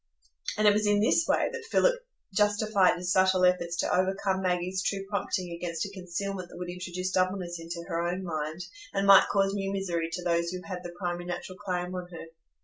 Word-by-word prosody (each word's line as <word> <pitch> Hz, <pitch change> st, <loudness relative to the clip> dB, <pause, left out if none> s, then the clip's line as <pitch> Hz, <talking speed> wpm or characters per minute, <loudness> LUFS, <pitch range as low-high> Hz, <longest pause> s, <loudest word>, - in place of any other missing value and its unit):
And 215 Hz, 0 st, +4 dB
it 205 Hz, -, +7 dB
was 210 Hz, 0 st, +1 dB
in 205 Hz, 0 st, +4 dB
this 255 Hz, +10 st, +3 dB
way -, -, +2 dB
that 470 Hz, -1 st, -6 dB
Philip -, -, +4 dB, 0.4 s
justified 205 Hz, -1 st, +3 dB
his 180 Hz, 0 st, -2 dB
subtle 185 Hz, -1 st, +4 dB
efforts 175 Hz, -1 st, +2 dB
to -, -, +1 dB
overcome 190 Hz, +1 st, +1 dB
Maggie's 185 Hz, 0 st, 0 dB
true 195 Hz, 0 st, -2 dB
prompting 185 Hz, -3 st, -2 dB
against 170 Hz, 0 st, -3 dB
a 200 Hz, -, -7 dB
concealment 185 Hz, 0 st, -4 dB
that -, -, -11 dB
would 175 Hz, 0 st, -5 dB
introduce 180 Hz, +1 st, -4 dB
doubleness 185 Hz, -2 st, 0 dB
into 170 Hz, +1 st, -6 dB
her 165 Hz, -2 st, -1 dB
own 180 Hz, +2 st, -2 dB
mind, 155 Hz, -1 st, -3 dB, 0.3 s
and 195 Hz, 0 st, +1 dB
might 195 Hz, -1 st, +8 dB
cause 195 Hz, -1 st, +2 dB
new 195 Hz, -1 st, -2 dB
misery 175 Hz, -4 st, -1 dB
to 180 Hz, +1 st, -3 dB
those 170 Hz, -1 st, +1 dB
who 180 Hz, 0 st, -5 dB
had 180 Hz, -2 st, -6 dB
the 175 Hz, 0 st, -8 dB
primary 175 Hz, -1 st, -3 dB
natural 180 Hz, +2 st, -6 dB
claim 180 Hz, -3 st, -3 dB
on 180 Hz, -1 st, -5 dB
her. 170 Hz, -2 st, -8 dB
185 Hz, 205 wpm, -28 LUFS, 175-195 Hz, 0.4 s, might